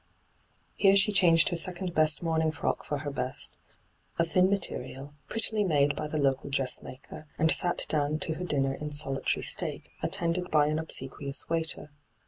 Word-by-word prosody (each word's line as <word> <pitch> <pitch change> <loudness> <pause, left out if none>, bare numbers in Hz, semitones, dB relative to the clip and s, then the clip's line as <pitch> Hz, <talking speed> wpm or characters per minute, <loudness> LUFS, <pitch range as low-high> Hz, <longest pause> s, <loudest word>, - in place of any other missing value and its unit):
Here 195 -1 +4
she 200 +2 +4
changed 170 -5 +5
her 175 - -2
second 180 +1 -2
best 155 0 +2
mourning 160 -1 0
frock 155 - -3
for 145 - -3
her 145 0 -5
best, 135 0 -3 0.6
a 170 - +2
thin 185 +2 +2
material, 145 -7 -2 0.2
prettily 220 -1 +2
made 145 -5 +1
by - - -4
the 155 - -4
local 135 -1 0
dressmaker, 135 +2 -4
and 160 +1 +3
sat 175 -1 +2
down 150 0 0
io 160 - -1
her - - -4
dinner 135 -5 0
in 150 +2 -6
solitary 145 -2 -1
state, - - -2
attended 175 +1 -1
by 150 -1 +3
an 155 +1 -1
obsequious 140 -2 -2
waiter. 165 -2 +1
155 Hz, 165 wpm, -28 LUFS, 145-175 Hz, 0.6 s, changed